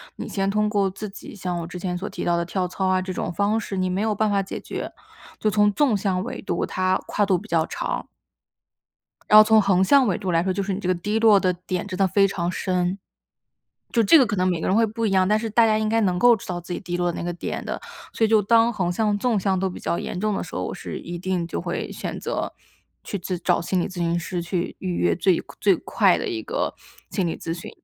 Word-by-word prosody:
你 - - -6
先 195 -1 -1
通 210 +1 +1
过 200 -2 +1
自 195 +3 -7
己 205 +1 -11
像 180 -2 -3
我 165 - -5
之 180 - -7
前 180 0 -3
所 190 +4 -4
提 - - -6
到 175 0 +2
的 170 - 0
跳 180 +1 -2
操 190 +1 -2
啊， 185 0 +3
这 185 0 -4
种 - - -3
方 205 +5 +1
式， 200 -2 -5
你 185 0 +1
没 190 +2 -1
有 215 -1 0
办 215 +1 +1
法 200 -1 +2
解 195 - -6
决， - - -6 0.5
就 215 - +1
从 210 0 +4
纵 255 +1 +2
向 190 -2 0
纬 - - -6
度， - - -2
它 185 0 0
跨 210 - 0
度 185 -2 +3
比 - - -10
较 165 -1 +1
长。 - - -3 1.2
然 215 - +9
后 - - +11
从 220 0 +5
横 190 -2 +3
向 265 +7 +5
纬 190 -5 +1
度 190 -3 -3
来 165 -1 +2
说， 190 +1 0
就 195 +1 -2
是 195 0 -2
你 190 - -3
这 190 - -5
个 185 - +3
低 210 +5 -1
落 220 -2 +6
的 185 -1 +2
点 180 +1 -4
真 185 -1 -5
的 195 - +4
非 195 +2 +4
常 175 -2 -2
深。 180 +1 -1 0.9
就 235 - +3
这 270 +10 +7
个 260 - +5
可 205 - -2
能 185 0 +2
每 175 -3 0
个 - - -2
人 190 - +2
会 230 - +5
不 225 +1 -2
一 205 - +1
样， 185 -1 +4
但 210 +1 +3
是 225 0 -3
大 230 +2 +4
家 215 -1 +2
应 215 0 0
该 225 +1 +2
能 185 -4 +1
够 245 +3 +6
知 - - -11
道 175 -1 -3
自 175 +1 -8
己 - - -3
低 175 -2 -4
落 175 -1 0
那 - - -5
个 175 - -2
点 175 - -5
的。 - - -4 0.3
所 225 - +1
以 - - +3
就 220 -1 +4
当 230 +3 +4
横 185 -5 -1
向、 210 +2 +1
纵 230 0 +1
向 190 -1 +1
都 190 0 0
比 - - -8
较 170 - -1
严 - - -4
重 215 0 0
的 - - -2
时 - - -9
候， - - -2
我 - - -4
是 - - -6
一 175 - -7
定 180 -1 -2
就 - - -4
会 - - -4
选 - - -5
择 - - -3 0.5
去 - - -4
咨 180 0 -4
找 - - +2
心 180 +2 0
理 - - -1
咨 190 - -11
询 170 0 0
师 175 +1 -4
去 170 +1 -3
预 185 -2 -2
约 85 -1 +2
最 185 - +2 0.2
最 195 -3 +4
快 - - +2
的 460 - -3
一 345 -3 -3
个 - - -2 0.4
心 190 -4 -1
理 165 - -2
咨 165 - -4
询。 170 - -8
190 Hz, 295 characters per minute, -23 LUFS, 180-210 Hz, 1.2 s, 后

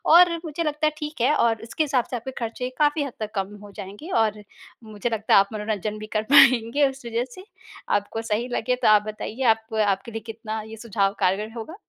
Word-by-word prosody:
और 350 -1 +7
मुझे 320 +1 -3
लगता 305 0 0
है - - +1
ठीक 300 -5 -6
है 275 +5 +4
और 225 -2 +2
इसके 230 +7 -1
हिसाब 265 -5 +1
से - - -1
आपके 245 +3 -5
ख़र्चे 240 +2 -3
काफ़ी 295 0 +3
हद 275 -4 -6
तक 215 -1 -4
कम 195 +1 -3
हो 205 - -11
जाएँगे 205 - -9
और 210 -1 -2 0.4
मुझे 215 +1 -4
लगता 220 -1 0
है - - +9
आप 200 0 +2
मनोरंजन 215 0 -3
भी 215 - -7
कर 215 - 0
पाएँगे 260 +1 +6
उस 270 -2 -11
वजह 235 +1 -1
से। 370 - -11 0.5
आपको 225 +2 -6
सही 230 +4 0
लगे 250 +1 0
तो 250 - 0
आप 210 -1 +7
बताइए 215 +4 -5
आप 220 0 -18
आपके 200 +4 -1
लिए 225 0 -5
कितना 220 -1 -5
ये 225 0 -9
सुझाव 205 -3 0
कारगर 200 +3 +1
होगा? 230 +10 -7
225 Hz, 220 wpm, -24 LUFS, 215-270 Hz, 0.5 s, है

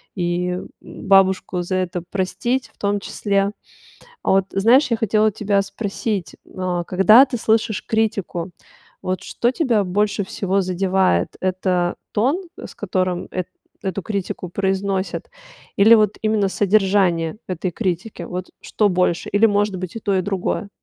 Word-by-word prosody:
и 180 0 -1 0.2
бабушку 190 -1 +2
за 185 +2 -2
это 180 -1 -2
простить 215 +7 -2
в - - -36
том 205 0 0
числе. 200 0 -1 0.7
А - - 0
вот 190 0 +3
знаешь, 245 +7 +4
я 230 - +2
хотела 215 0 +2
тебя 205 -1 0
спросить, 200 -3 -4 0.2
а 180 -2 -2
когда 195 +8 +6
ты 255 - -3
слышишь 220 -2 +1
критику, 205 -6 -1 0.5
вот 185 0 -2
что 240 - 0
тебя 245 - +1
больше 205 +2 0
всего 195 +1 -1
задевает: 185 - +1
это 185 -1 0 0.2
тон, 270 - +1 0.2
с - - -9
которым 185 -2 -2
эт 185 -1 -3 0.3
эту 190 0 -3
критику 195 -3 -4
произносят, 195 +1 -2 0.5
или 215 +3 +7
вот 215 -2 +3
именно 215 -2 +2
содержание 190 -4 +2
этой 185 0 -3
критики? 185 +2 -3
Вот 180 0 -5
что 210 - +1
больше? 180 -2 0
Или, 205 +2 +4
может 205 -2 +1
быть, 185 -1 -6
и - - -4
то, 200 -2 0
и 185 - +1
другое? 195 +2 -2
195 Hz, 145 wpm, -21 LUFS, 185-210 Hz, 0.7 s, или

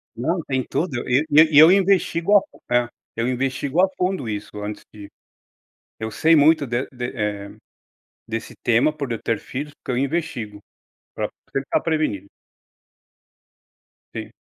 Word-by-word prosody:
Não, 165 +9 -1
tem 130 -2 -1
tudo. 140 -8 -2
E, 135 +5 +3
ne 150 +2 +8
e 145 - +4
eu 160 +3 +9
investigo 195 -1 +3
a - - +3
fun - - -18
é, 120 -1 +2 0.3
eu 115 +1 -1
investigo 135 +5 0
a 190 - +5
fundo 185 -9 -1
isso 105 0 -5
antes 105 +1 -6
de 100 -1 -11 0.9
eu 110 0 -4
sei 160 +6 +4
muito 150 -1 +4
de 120 +2 -2
de 125 -1 -6
eh, 105 -2 -3 0.8
desse 115 0 -5
tema 120 +6 +3
por 140 -5 -5
eu 115 - -4
ter 115 -3 -1
filhos, 145 +3 -6
porque - - -9
eu 135 - +2
investigo, 125 -10 -4 0.6
pra - - -2 0.2
tentar 135 0 0
prevenir. 155 - -1 1.9
Sim. - - -6
135 Hz, 155 wpm, -22 LUFS, 115-160 Hz, 1.9 s, eu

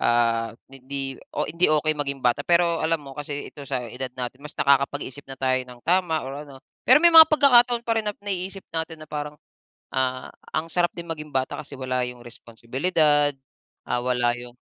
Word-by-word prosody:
ah, 115 -1 +1 0.2
hindi 135 0 -5 0.2
o - - -1
hindi 170 +2 +2
okey 155 0 +3
maging 140 -2 -2
bata, 120 -1 +3
pero 170 -1 +3
alam 160 0 +1
mo 135 - -10
kasi 145 0 -5
ito 145 - -12
sa 130 -3 -2
edad 130 +3 -5
natin 125 +1 -5
mas 150 - -9
nakakapag-isip 140 0 0
na 135 - -7
tayo 130 -1 +1
ng 125 -1 -13
tama 170 -3 +1
or 140 +3 -7
ano. 135 - -12 0.3
Pero 295 - +8
may 340 - +7
mga 320 -1 +10
pagkakataon 245 -6 +5
pa 230 -1 +1
rin 215 - -11
na 205 - -3
naiisip 195 -1 -5
natin 160 -1 -4
na - - -25
parang, 150 0 -5 0.6
ah, 130 -1 -1 0.3
ang 160 +1 -1
sarap 175 -1 +1
din 170 -1 -7
maging 155 -2 -6
bata 130 +2 -1
kasi 145 -1 -11
wala 130 -1 -1
yung 125 -1 -9
responsibilidad, 145 +6 +1 0.6
ah, 120 - 0
wala 120 -1 +1
yung 120 0 -9
145 Hz, 190 wpm, -24 LUFS, 130-170 Hz, 0.6 s, mga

